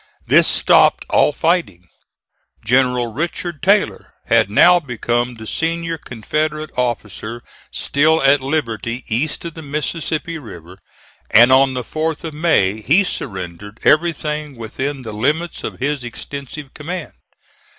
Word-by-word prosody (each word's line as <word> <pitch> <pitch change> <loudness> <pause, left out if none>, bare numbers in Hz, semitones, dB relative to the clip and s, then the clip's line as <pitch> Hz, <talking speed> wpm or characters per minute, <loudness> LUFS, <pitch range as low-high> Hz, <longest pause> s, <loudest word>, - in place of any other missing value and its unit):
This - - +5
stopped - - +4
all - - +4
fighting. 150 - -1 0.8
General 125 -1 +2
Richard 170 +2 -3
Taylor 200 +1 +1
had - - +3
now 175 +12 +6
become 120 -3 -2
the 110 -1 -10
senior 165 +4 -2
Confederate 155 +6 -3
officer 120 -1 -3 0.3
still 155 +3 +2
at 135 0 +5
liberty 120 -4 -2
east 135 +9 -1
of 165 - -5
the 160 - -9
Mississippi 155 +2 -3
River, 90 - -12 0.5
and 120 +4 +7
on 130 0 +4
the 125 - -3
4th 155 +4 -3
of 160 -2 -5
May 110 - +1
he 160 - +4
surrendered 105 - -6
everything 150 -2 +1
within 130 +4 -5
the 110 -2 -7
limits 150 +10 -1
of - - -5
this 140 +1 -1
extensive 140 +3 -8
command. 170 +3 -6
140 Hz, 130 wpm, -18 LUFS, 115-160 Hz, 0.8 s, and